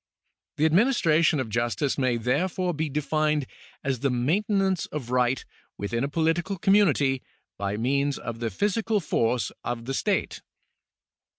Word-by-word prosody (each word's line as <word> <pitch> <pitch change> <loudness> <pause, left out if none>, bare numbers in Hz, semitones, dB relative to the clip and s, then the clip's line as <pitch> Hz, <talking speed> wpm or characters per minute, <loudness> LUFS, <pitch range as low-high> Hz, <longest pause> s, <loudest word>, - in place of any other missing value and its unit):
The 155 - +3
administration 165 - +3
of 130 - -2
justice 120 +4 0
may 130 -3 +1
therefore 175 +9 0
be 155 0 -2
defined 150 0 0 0.4
as 135 -3 -1
the 140 +2 +1
maintenance 190 - +1
of 130 -5 -6
right 125 0 +1 0.3
within 115 +4 -2
a - - +1
political 165 +5 0
community 160 -9 +3 0.4
by 100 +1 -2
means 140 +4 0
of 115 -1 -6
the 115 -1 -1
physical 210 - 0
force 125 - 0
of 120 -1 -4
the 135 - -3
state. - - -1
145 Hz, 135 wpm, -26 LUFS, 125-175 Hz, 0.4 s, The